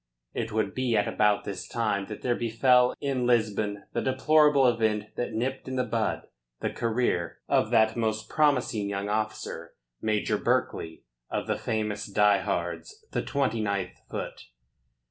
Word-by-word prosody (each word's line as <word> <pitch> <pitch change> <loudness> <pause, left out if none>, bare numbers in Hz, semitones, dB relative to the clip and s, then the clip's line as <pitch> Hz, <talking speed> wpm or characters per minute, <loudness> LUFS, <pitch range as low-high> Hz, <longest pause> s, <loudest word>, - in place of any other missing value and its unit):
It 115 -1 -3
would 105 -2 0
be 125 -3 +1
at 105 - +2
about 105 -1 +2
this 95 -2 -5
time 105 -4 -1
that 105 - -8
there 125 - +2
befell 125 +2 +3
in 135 -3 0
Lisbon 105 -4 +1
the - - 0
deplorable 145 +1 +4
event 110 -3 +1
that 120 -1 -3
nipped 130 +5 -2
in 130 - -3
the 130 - +1
bud 115 -2 -1 0.3
the - - -2
career 115 -7 -1
of - - +2
that 110 0 +4
most 110 -2 -1
promising 125 -9 +1
young 100 0 -3
officer, 110 +1 -3 0.3
Major 110 -1 0
Berkeley 80 0 -1 0.3
of - - -2
the - - 0
famous 105 -1 -2
Die 105 0 +4
Hards, 95 - -4
the - - 0
29th 110 -9 -1
Foot. - - -6
110 Hz, 150 wpm, -27 LUFS, 105-125 Hz, 0.3 s, deplorable